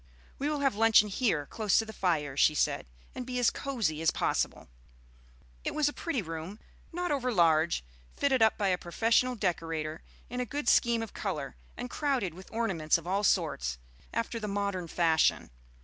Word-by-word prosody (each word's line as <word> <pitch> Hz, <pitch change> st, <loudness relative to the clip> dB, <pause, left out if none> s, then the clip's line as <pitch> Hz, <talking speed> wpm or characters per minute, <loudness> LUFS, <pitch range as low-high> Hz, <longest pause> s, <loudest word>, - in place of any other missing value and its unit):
"We 285 Hz, +2 st, 0 dB
will 300 Hz, -1 st, -1 dB
have 275 Hz, -2 st, +2 dB
luncheon 215 Hz, 0 st, +5 dB
here 195 Hz, -, 0 dB
close 215 Hz, +4 st, +1 dB
to 225 Hz, -, +2 dB
the 220 Hz, -, -9 dB
fire," 155 Hz, -8 st, 0 dB
she 150 Hz, +2 st, +4 dB
said, 135 Hz, -, 0 dB, 0.3 s
"and 255 Hz, -, -5 dB
be 250 Hz, 0 st, -4 dB
as 245 Hz, -2 st, +3 dB
cosey 220 Hz, -, -2 dB
as 165 Hz, -, +4 dB
possible." -, -, -1 dB, 1.0 s
It -, -, -3 dB
was 305 Hz, -1 st, +3 dB
a 290 Hz, -, -1 dB
pretty 275 Hz, -, -2 dB
room, 165 Hz, +5 st, -6 dB, 0.3 s
not 355 Hz, -1 st, -2 dB
over 255 Hz, -3 st, 0 dB
large, 165 Hz, -, +3 dB, 0.3 s
fitted 265 Hz, -3 st, +2 dB
up 220 Hz, -1 st, +4 dB
by 200 Hz, -2 st, +1 dB
a 180 Hz, -1 st, +1 dB
professional 230 Hz, +8 st, +1 dB
decorator 165 Hz, -6 st, -2 dB, 0.3 s
in 250 Hz, +1 st, -5 dB
a -, -, +1 dB
good 290 Hz, +5 st, -4 dB
scheme 235 Hz, -2 st, +4 dB
of 225 Hz, -, -8 dB
color, 155 Hz, -9 st, -4 dB, 0.2 s
and 245 Hz, -, -4 dB
crowded 250 Hz, -, -1 dB
with 185 Hz, +2 st, -12 dB
ornaments 190 Hz, -10 st, +1 dB
of 165 Hz, -, -11 dB
all 195 Hz, +3 st, 0 dB
sorts, 65 Hz, -, +1 dB, 0.3 s
after 230 Hz, 0 st, -2 dB
the 215 Hz, -, -4 dB
modern 200 Hz, -3 st, -2 dB
fashion. 160 Hz, -, +2 dB
205 Hz, 180 wpm, -30 LUFS, 165-245 Hz, 1.0 s, luncheon